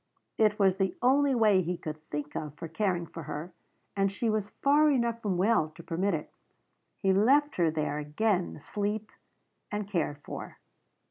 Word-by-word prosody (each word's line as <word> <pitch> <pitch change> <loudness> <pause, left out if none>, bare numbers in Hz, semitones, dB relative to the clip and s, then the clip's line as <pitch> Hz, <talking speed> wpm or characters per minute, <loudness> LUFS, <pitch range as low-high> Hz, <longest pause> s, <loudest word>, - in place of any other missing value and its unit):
It 215 -1 +4
was 195 -3 +3
the 195 -1 0
only 275 +2 +4
way 210 -5 +4
he 175 0 -2
could 155 -1 -6
think 150 0 -4
of 150 -2 -4
for 165 - -6
caring 175 +1 -1
for 165 - -9
her, 155 +4 -6 0.4
and 195 -1 +2
she 220 +3 -1
was 210 -1 -1
far 295 +5 +3
enough 235 -4 +1
from 195 -5 -1
well 190 -4 +3
to 170 - -11
permit 180 +3 0
it. 150 - -7 0.6
He 195 -1 +2
left 275 +9 +3
her 170 -3 +3
there, 155 -1 -1
again 180 +6 0
asleep, 210 +7 -3 0.6
and 210 -1 -3
cared 165 -7 -1
for. - - -7
195 Hz, 175 wpm, -29 LUFS, 165-220 Hz, 0.6 s, It